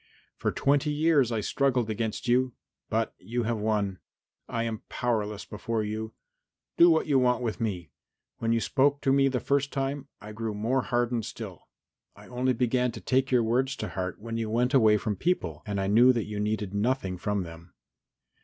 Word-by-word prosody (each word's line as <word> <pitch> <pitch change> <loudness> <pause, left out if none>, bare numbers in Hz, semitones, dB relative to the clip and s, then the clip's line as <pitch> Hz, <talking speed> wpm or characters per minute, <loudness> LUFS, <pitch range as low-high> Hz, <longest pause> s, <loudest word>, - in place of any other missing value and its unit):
"For - - -1
twenty 145 +2 +2
years 150 -4 +3
I 110 -2 0
struggled 130 0 +1
against 110 +2 -3
you, 125 +1 +2 0.4
but - - 0
you 120 +6 -3
have 115 0 -1
won. 105 -3 0 0.5
I 115 - -1
am 115 0 -3
powerless 105 -4 -2
before 110 +1 -3
you. 110 +1 -4 0.6
Do 170 - +7
what 160 -1 +3
you 140 -3 +3
want 125 0 +2
with 115 0 -3
me. 90 -8 -3 0.5
When 115 0 0
you 115 - +3
spoke 140 +4 +2
to 135 - +2
me 135 0 +4
the 130 -2 0
first 140 +3 0
time, 135 0 -2
I 105 0 -9
grew 110 0 -4
more 120 +6 +1
hardened 120 -2 0
still. - - -8 0.5
I - - -14
only 125 +1 +1
began 125 +1 +1
to - - -7
take 130 +1 +1
your 125 -2 +3
words 130 +4 +1
to - - -5
heart 90 -1 -4
when 115 +1 -5
you 115 -1 -2
went 125 +4 +1
away 110 -5 +6
from 105 -1 -2
people 90 - -1
and 100 -1 -2
I 95 - 0
knew 115 +6 +6
that 115 -4 -1
you 105 -1 -5
needed 105 -1 -2
nothing 100 -4 -1
from 105 0 -1
them. 85 +1 -12
115 Hz, 190 wpm, -28 LUFS, 105-130 Hz, 0.6 s, Do